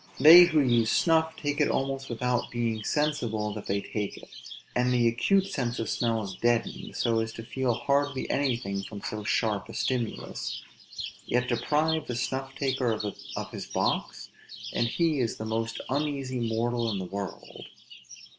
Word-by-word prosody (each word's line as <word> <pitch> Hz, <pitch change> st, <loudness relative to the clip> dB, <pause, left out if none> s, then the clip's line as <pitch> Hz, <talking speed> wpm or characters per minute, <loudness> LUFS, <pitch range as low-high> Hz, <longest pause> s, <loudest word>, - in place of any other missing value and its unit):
They 165 Hz, +6 st, +11 dB
who 155 Hz, -3 st, +3 dB
use 120 Hz, -4 st, +3 dB
snuff, 160 Hz, -1 st, +3 dB
take 145 Hz, 0 st, -1 dB
it 150 Hz, -, +3 dB
almost 135 Hz, 0 st, -1 dB
without 125 Hz, +1 st, -1 dB
being 115 Hz, -2 st, -2 dB
sensible 120 Hz, -9 st, 0 dB
that 105 Hz, -, -7 dB
they 100 Hz, +1 st, 0 dB
take 105 Hz, -1 st, -4 dB
it, -, -, -13 dB, 0.4 s
and 125 Hz, 0 st, +2 dB
the 120 Hz, -1 st, +3 dB
acute 190 Hz, +12 st, +3 dB
sense 125 Hz, -8 st, -2 dB
of 115 Hz, -, -2 dB
smell 115 Hz, -2 st, 0 dB
is 95 Hz, -2 st, -5 dB
deadened, 120 Hz, -1 st, 0 dB
so 115 Hz, -1 st, +1 dB
as 110 Hz, 0 st, -2 dB
to 115 Hz, -, -8 dB
feel 125 Hz, 0 st, -1 dB
hardly 140 Hz, +1 st, 0 dB
anything 120 Hz, -8 st, 0 dB
from 100 Hz, 0 st, -8 dB
so 105 Hz, 0 st, -4 dB
sharp 105 Hz, -2 st, 0 dB
a -, -, -8 dB
stimulus; 115 Hz, -, -2 dB, 0.6 s
yet 125 Hz, 0 st, +1 dB
deprive 150 Hz, +6 st, +1 dB
the 125 Hz, -, -3 dB
snuff 135 Hz, +2 st, -3 dB
taker 135 Hz, -3 st, 0 dB, 0.5 s
of -, -, -5 dB
his -, -, -6 dB
box, -, -, -1 dB, 0.4 s
and 120 Hz, -, +1 dB
he 160 Hz, +3 st, +1 dB
is 120 Hz, -3 st, -1 dB
the 110 Hz, -, -5 dB
most 115 Hz, +1 st, -2 dB
uneasy 135 Hz, -4 st, -1 dB
mortal 115 Hz, +1 st, 0 dB
in 105 Hz, -, -1 dB
the 95 Hz, -, -4 dB
world. 100 Hz, +1 st, -7 dB
120 Hz, 165 wpm, -28 LUFS, 115-140 Hz, 0.6 s, They